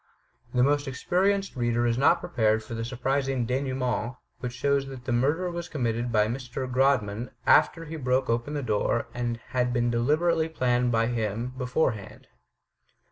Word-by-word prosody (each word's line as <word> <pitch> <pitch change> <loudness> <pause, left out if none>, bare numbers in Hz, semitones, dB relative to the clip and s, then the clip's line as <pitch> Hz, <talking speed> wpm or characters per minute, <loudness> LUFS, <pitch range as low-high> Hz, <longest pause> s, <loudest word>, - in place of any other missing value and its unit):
The 125 0 +3
most 145 +1 +2
experienced 195 +8 0
reader 120 -1 +1
is 120 -1 +2
not 130 - +4
prepared 110 -2 +1
for 110 - -8
the 115 0 -3
sur 120 +2 -5
prizing 135 0 0
denouement, 125 -1 -1 0.2
which 125 -1 -4
shows 140 +2 +1
that 130 -2 -9
the 130 - -2
murder 150 +9 +1
was 170 0 -5
com 145 -7 -3
mitted 120 +1 -1
by 105 -2 +4
Mr. 125 +2 -4
Grodman, 125 -4 +1 0.2
after 165 -1 +4
he 160 +1 -6
broke 130 -1 +1
open 120 +6 -1
the 145 - -2
door, 110 +1 0
and 120 -1 -2
had 125 -1 0
been 120 0 +1
deliberately 160 +7 +2
planned 125 -5 +1
for - - +1
by 115 0 +3
him, 115 +1 -2
beforehand. 125 -5 -2
125 Hz, 175 wpm, -27 LUFS, 120-140 Hz, 0.2 s, not